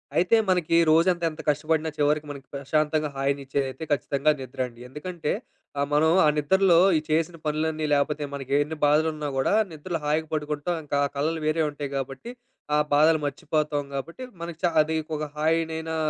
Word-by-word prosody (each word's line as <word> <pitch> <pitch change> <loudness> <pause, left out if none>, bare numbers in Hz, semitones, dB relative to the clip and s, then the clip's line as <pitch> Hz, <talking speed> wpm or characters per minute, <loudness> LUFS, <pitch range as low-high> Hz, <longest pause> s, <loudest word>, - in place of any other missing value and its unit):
అయితే, 180 +6 +4
మనకి 175 -2 +2 0.2
రోజంత 175 +2 +3
ఎంత 155 - -9
కష్టపడినా 155 +2 0
చివరికి 150 +1 +1
మనకి 140 -2 -9
ప్రశాంతంగా 150 +2 0
హాయినిచ్చేదైతే 135 0 -2
ఖచ్చితంగా 140 +2 +2
నిద్రండి. 125 -2 -5
ఎందుకంటే 155 +3 -4 0.5
ఆహ్, 140 - +1
మనం 155 +2 +4
ఆ - - +5
నిద్రలో 175 +4 +4 0.2
ఈ - - +2
చేసిన 165 +2 +1
పనులన్నీ 155 0 -1
లేపోతే 145 +1 +1
మనకెన్ని 140 +3 -1
బాధలున్నా 155 0 +2
గూడా 135 -1 +1 0.2
నిద్రలో 165 +2 -4
హాయిగా 155 +2 0
పడుకుంటాం. 150 +2 -2
ఇంకా 145 -1 -2
ఆ - - 0
కలలు 160 +3 -1
వేరే 155 +1 +1
ఉంటాయి 145 -1 -6
గాబట్టి, 135 - -5 0.4
ఆ - - +4 0.2
బాధలు 155 +2 +5
మర్చిపోతాం 145 +1 -1
గాబట్టి, 165 - -5 0.2
మనకి 170 -1 -6
చ 175 - +3
అది 160 +1 -1 0.2
ఒక 150 - -4
హాయినైనా 160 +1 -1
150 Hz, 155 wpm, -25 LUFS, 145-160 Hz, 0.5 s, ఆ